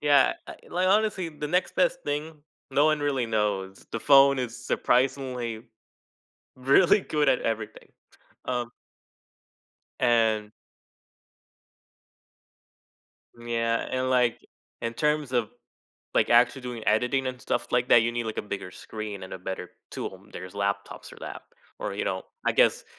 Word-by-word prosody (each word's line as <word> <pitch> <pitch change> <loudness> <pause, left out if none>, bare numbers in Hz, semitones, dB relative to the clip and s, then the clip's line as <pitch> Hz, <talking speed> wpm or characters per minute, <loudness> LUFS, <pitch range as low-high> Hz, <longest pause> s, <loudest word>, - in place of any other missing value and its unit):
Yeah, 145 -2 +5 0.3
e - - -17
like, 185 +1 +1
honestly, 205 -3 +2
the 150 -1 -6
next 180 +3 0
best - - +2
thing, 150 +1 -4 0.3
no 140 +2 +3
one 155 -1 +2
really 140 -4 0
knows. 105 -3 -1
The 115 - -2
phone 140 +1 +6
is 125 -1 -3
surprisingly 125 -3 0 0.9
really 140 +10 +5
good 150 -4 +1
at - - +2
everything. 110 -1 -4 0.5
Um 120 -1 -2 1.3
And 110 -3 +2 2.8
Yeah, 115 -1 -1
and 130 0 0
like 125 -2 +2 0.4
in 115 0 -2
terms 150 +1 0
of 120 -4 0 0.7
like, - - +3
actually 120 +3 +4
doing 125 -2 -6
editing 125 +5 +2
and 130 -1 -4
stuff - - -2
like 125 0 +2
that, 120 - +7
you 115 +1 0
need, 120 -1 -2
like, 110 - -4
a - - -2
bigger 100 -3 -6
screen 105 0 -7
and 95 - -9
a - - -5
better 95 0 -6 0.2
tool, - - -6
there's 90 0 -8
laptops 100 0 -3
or - - -13
that - - -7 0.4
or, 100 - -4
you 100 - -2
know 95 -1 -2 0.2
I - - +4
guess, - - +3
120 Hz, 145 wpm, -27 LUFS, 110-140 Hz, 2.8 s, that